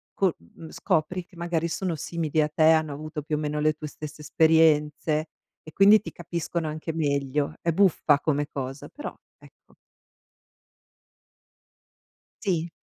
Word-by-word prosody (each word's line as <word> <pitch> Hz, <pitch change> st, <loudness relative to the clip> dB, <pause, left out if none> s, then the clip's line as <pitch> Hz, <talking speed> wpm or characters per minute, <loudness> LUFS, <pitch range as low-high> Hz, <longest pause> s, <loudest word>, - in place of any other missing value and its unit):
co 190 Hz, -4 st, +2 dB
mhmm, 155 Hz, -, -14 dB
scopri 175 Hz, +4 st, -1 dB
che 180 Hz, -, -21 dB
magari 170 Hz, -1 st, -1 dB
sono 170 Hz, +1 st, -2 dB
simili 160 Hz, 0 st, -1 dB
a 150 Hz, -, +1 dB
te, 155 Hz, -, +1 dB
hanno 155 Hz, -2 st, +2 dB
avuto 155 Hz, +1 st, -6 dB
più 155 Hz, 0 st, -2 dB
o -, -, -3 dB
meno 150 Hz, 0 st, -2 dB
le 155 Hz, 0 st, +2 dB
tue 155 Hz, -, -9 dB
stesse 150 Hz, +1 st, -9 dB
esperienze 155 Hz, 0 st, +3 dB, 0.4 s
e 155 Hz, -, -11 dB
quindi 205 Hz, +2 st, +7 dB
ti -, -, -8 dB
capiscono 170 Hz, -1 st, -4 dB
anche 155 Hz, +1 st, -5 dB
meglio. 140 Hz, -2 st, -1 dB
È 170 Hz, -, +1 dB
buffa 165 Hz, -5 st, +3 dB
come 145 Hz, 0 st, 0 dB
cosa, 135 Hz, 0 st, -6 dB
però, 295 Hz, -, -7 dB, 0.2 s
ecco. -, -, -21 dB, 2.7 s
Sì. 175 Hz, -5 st, 0 dB
155 Hz, 145 wpm, -26 LUFS, 150-170 Hz, 2.7 s, quindi